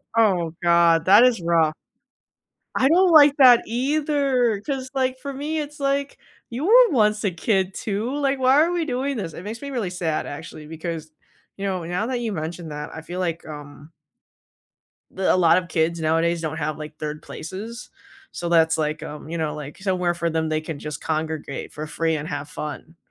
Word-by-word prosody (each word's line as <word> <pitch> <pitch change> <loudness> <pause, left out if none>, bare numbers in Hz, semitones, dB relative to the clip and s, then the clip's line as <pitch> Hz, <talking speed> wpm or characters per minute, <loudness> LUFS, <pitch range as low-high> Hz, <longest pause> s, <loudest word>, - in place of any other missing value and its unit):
Oh 185 -8 +2
god, 170 -1 +4
that 205 +5 +7
is 245 -6 +3
rough. 165 -2 +2 1.0
I 265 - +3
don't 360 +2 +5
like 295 -3 +7
that 250 -4 +8
either, 265 -2 +1
'cause, 265 +2 -4
like, 260 -1 0
for 280 +1 -5
me 300 +4 -3
it's, 295 0 -6
like, 280 0 -1 0.3
you 250 +6 -4
were 485 +5 +7
once 210 -5 +2
a 200 - +1
kid 190 +2 0
too, 220 +7 -3
like, 275 -1 0
"Why 265 +4 +5
are 340 - 0
we 345 -2 -1
doing 270 0 -2
this?" 175 -7 -4
It 170 - -9
makes 220 +3 -6
me 280 - -6
really 240 -9 -2
sad 170 -4 -2
actually, 155 +1 -8
because, 160 0 -6 0.5
you 200 - -4
know, 185 -3 -2
now 180 +6 -2
that 250 -1 -2
you 230 -2 -2
mentioned 165 -1 -5
that, 150 +1 -6
I 160 - -7
feel 175 +3 -6
like, 170 -3 -2
um 150 0 -10 1.2
d 190 - -5
a - - +4
lot 170 -2 +5
of 180 -1 -1
kids, 170 0 0
nowadays 165 +1 +1
don't 160 -1 -3
have, 155 -1 -2
like, 155 0 -9
3rd 150 0 -5
places, 215 +8 -8 0.5
so 175 - -3
that's 160 -1 +3
like, 155 0 -2
um, 150 +1 -8
you 170 - -3
know, 155 -2 -2
like, 150 -1 -8
somewhere 185 -3 0
for 170 0 -1
them 160 -1 -1
they 155 0 0
can 155 -2 -6
just 150 -1 -6
congregate 155 -3 -3
for 155 - -6
free 160 +1 -1
and 150 0 -4
have 145 -1 -5
fun. 150 +2 -7
180 Hz, 195 wpm, -23 LUFS, 160-255 Hz, 1.2 s, that